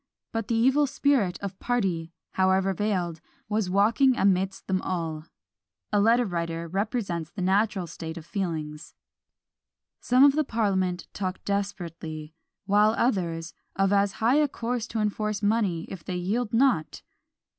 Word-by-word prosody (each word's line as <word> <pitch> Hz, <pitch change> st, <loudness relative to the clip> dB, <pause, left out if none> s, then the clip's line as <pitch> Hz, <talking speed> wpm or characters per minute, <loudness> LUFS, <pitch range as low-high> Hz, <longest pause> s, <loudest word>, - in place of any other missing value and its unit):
But 225 Hz, -2 st, -3 dB
the 230 Hz, -, 0 dB
evil 265 Hz, +6 st, +4 dB
spirit 265 Hz, -9 st, +1 dB
of 195 Hz, -1 st, -6 dB
party, 185 Hz, -9 st, -1 dB, 0.2 s
however 190 Hz, +1 st, +2 dB
veiled, 180 Hz, -5 st, -1 dB, 0.3 s
was 210 Hz, -3 st, 0 dB
walking 225 Hz, +7 st, +3 dB
amidst 190 Hz, 0 st, +1 dB
them 185 Hz, -1 st, 0 dB
all: 165 Hz, -4 st, -3 dB, 0.7 s
a 205 Hz, -, +4 dB
letter 230 Hz, +4 st, +4 dB
writer 170 Hz, -3 st, -3 dB
represents 195 Hz, -3 st, -2 dB
the 180 Hz, +1 st, -5 dB
natural 195 Hz, 0 st, +1 dB
state 165 Hz, 0 st, -7 dB
of 160 Hz, -, -9 dB
feelings: 160 Hz, -5 st, -4 dB, 1.0 s
"Some 250 Hz, +2 st, +4 dB
of 285 Hz, -, +8 dB
the 310 Hz, +1 st, +2 dB
parliament 190 Hz, -7 st, 0 dB
talk 185 Hz, -2 st, -4 dB
desperately; 165 Hz, -6 st, -4 dB, 0.3 s
while 210 Hz, +2 st, +4 dB
others, 170 Hz, -8 st, 0 dB, 0.2 s
of 195 Hz, +1 st, +2 dB
as 200 Hz, 0 st, +2 dB
high 235 Hz, +5 st, +2 dB
a 300 Hz, -1 st, +4 dB
course 235 Hz, -2 st, -3 dB
to 225 Hz, -, -3 dB
enforce 210 Hz, 0 st, -1 dB
money 205 Hz, -6 st, +1 dB
if 185 Hz, -4 st, -8 dB
they 180 Hz, -, -4 dB
yield 210 Hz, +6 st, -1 dB
not!" 230 Hz, -, +1 dB
195 Hz, 145 wpm, -26 LUFS, 175-225 Hz, 1.0 s, of